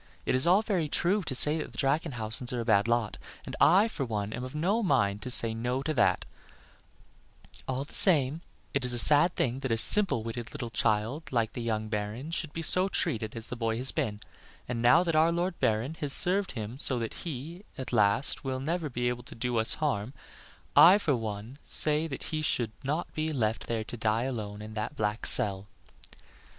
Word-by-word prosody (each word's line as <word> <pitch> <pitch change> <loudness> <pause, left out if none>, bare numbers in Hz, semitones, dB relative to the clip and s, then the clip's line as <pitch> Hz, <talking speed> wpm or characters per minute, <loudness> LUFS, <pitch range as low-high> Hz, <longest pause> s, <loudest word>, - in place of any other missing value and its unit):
"It - - 0
is 130 +5 0
all 190 +5 +4
very 180 -9 -2
true 185 +7 0
that 185 - -9
the 150 +3 +2
Drachenhausens 130 -5 0
are 125 - -3
a 115 - -4
bad 105 -2 +2
lot, 120 -2 -1 0.3
and - - -7
I 190 +7 +5
for 190 -11 -5
one 105 -3 -4
am 125 - -6
of 130 +3 -8
no 190 +9 0
mind 105 - 0
to 130 - -6
say 115 -2 +5
no 125 +4 -3
to 155 - -2
that; 135 - +1 1.4
all 130 +1 -3
the 145 - -16
same 155 -4 +3 0.3
it 140 - -1
is 125 -1 +1
a - - -3
sad 150 +7 +4
thing 125 +1 -2
that 135 - -4
a 115 - +1
simple 195 - +6
witted 115 +2 -7
little 125 -6 -6
child 115 +7 -2
like 115 -3 -1
the 120 - -6
young 110 -2 -3
Baron 110 +7 -5
should 165 -2 -4
be 165 - -6
so 185 +3 +5
treated 110 - -3
as 115 0 -9
the - - -5
boy 115 -1 -2
has 130 +2 +3
been; 110 -10 -3 0.5
and 120 -1 -4
now 125 +8 +5
that 165 -3 -2
our 160 +2 +3
Lord 175 +1 -3
Baron 110 +7 -1
has 145 -2 -3
served 190 +2 +2
him 115 +2 -7
so 130 - +3
that 115 -2 -4
he, 165 +3 -7 0.2
at 130 - -7
least, 105 +6 +1
will 130 -1 -4
never 160 +3 -3
be 120 -1 -3
able 120 0 -3
to 120 - -13
do 120 +1 -3
us 110 0 0
'harm, 135 -5 -3 0.6
I 185 +4 +8
for 160 -9 0
one 110 +3 -7
say 155 +1 +1
that 135 - -7
he 155 - -1
should 120 -7 -1
not 150 +5 -3
be 155 0 -3
left 115 -5 -2
there 115 -2 -3
to 120 - -8
die 110 +1 0
alone 105 -5 -6
in 110 0 -10
that 105 0 -5
black 105 +1 -2
cell." 100 -5 +6
125 Hz, 210 wpm, -28 LUFS, 110-155 Hz, 1.4 s, I